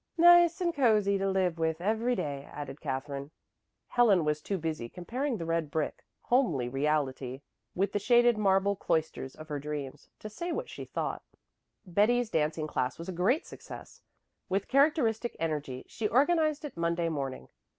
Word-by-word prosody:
"Nice 345 0 +7
and 345 -1 +1
cozy 215 -8 +3
to 195 0 0
live 185 -3 0
with 160 0 0
every 225 +6 +1
day," 140 -7 -4
added 145 -1 -7
Katherine. 140 +1 -4 0.6
Helen 210 -9 +4
was 150 0 0
too 195 +5 -2
busy 155 -8 -3
comparing 245 - -3
the 165 - -5
red 165 -2 -1
brick, 155 +1 -2 0.2
homely 175 - +2
reality 135 -1 -1 0.3
with 195 +3 +1
the 205 - 0
shaded 240 +2 +4
marble 200 -1 +2
cloisters 160 -7 -2
of 155 - -11
her 145 -1 -2
dreams, 145 -2 -6
to - - -8
say 340 +12 -5
what 480 +7 -3
she - - -7
thought. - - -3 0.6
Betty's 215 +6 +2
dancing 155 0 0
class 130 -4 -2
was 170 +3 -7
a - - -3
great 200 - +1
success. - - -11 0.5
With 195 +1 0
characteristic 265 -5 +2
energy 150 -5 -3
she 220 - -2
organized 305 +4 +2
it 295 - -7
Monday 170 0 0
morning. 140 -5 -4
180 Hz, 160 wpm, -30 LUFS, 150-240 Hz, 0.6 s, Nice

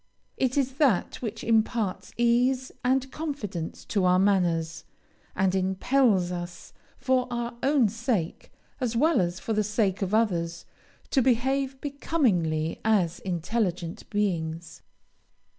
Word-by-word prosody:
It 260 +1 0
is 265 -2 +1
that 255 - +2
which 225 -2 -5
imparts 220 -3 0
ease 250 +2 +2
and 260 +1 +1
confidence 220 - -5
to 200 -3 0
our 180 0 +5
manners, 175 -4 +1 0.5
and 190 -1 +2
impels 190 +1 +2
us, 175 -1 -7 0.2
for 260 -1 +1
our 240 0 -3
own 275 -4 +3
sake, 225 -5 -2 0.3
as 245 -3 -1
well 300 - +3
as 175 +1 -2
for 225 - -3
the 215 0 +2
sake 205 -2 0
of 195 +2 0
others, 170 -7 0 0.5
to 270 - +4
behave 265 +2 +1
becomingly 195 - 0
as 190 -7 +2
intelligent 180 -1 -2
beings. 170 -5 -2
215 Hz, 125 wpm, -27 LUFS, 180-255 Hz, 0.5 s, our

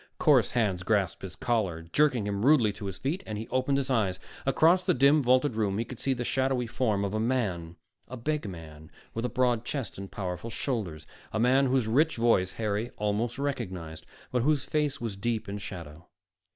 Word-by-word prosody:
Coarse - - +4
hands 105 -7 0
grasped 100 0 0
his 95 -2 -7
collar, 100 -9 -1
jerking 125 - +2
him 100 0 -2
rudely 125 -7 +5
to 105 0 -8
his 95 - -5
feet, 160 +8 -2
and 110 -1 -4
he 110 - -5
opened 130 +2 +1
his 135 -1 -1
eyes. 100 -7 +1 0.3
Across 165 +7 +4
the - - +4
dim, 140 +4 +5
vaulted 130 +1 +3
room 100 -3 0
he 115 - -1
could 130 - -9
see 135 -1 0
the 120 - -3
shadowy 130 0 0
form 115 -4 0
of 100 - -3
a 110 - 0
man, 100 -9 -1 0.3
a 130 - -7
big 145 -2 -2
man, 80 -3 -10 0.2
with 115 +2 -2
a - - 0
broad 125 -3 +1
chest 125 -5 -4
and 100 0 -7
powerful 90 +2 -4
shoulders, 100 - -3 0.3
a 110 - -1
man 130 +4 +4
whose 130 -3 +1
rich 150 +8 +3
voice 105 -6 +3
Harry 110 +1 -2
almost 105 +3 -1
recognized, 95 - -4 0.2
but 125 - +1
whose 145 +1 +2
face 150 0 -1
was 115 -5 -4
deep 110 +2 -2
in 100 +1 -4
shadow. 85 -3 -9
115 Hz, 200 wpm, -28 LUFS, 100-130 Hz, 0.3 s, rudely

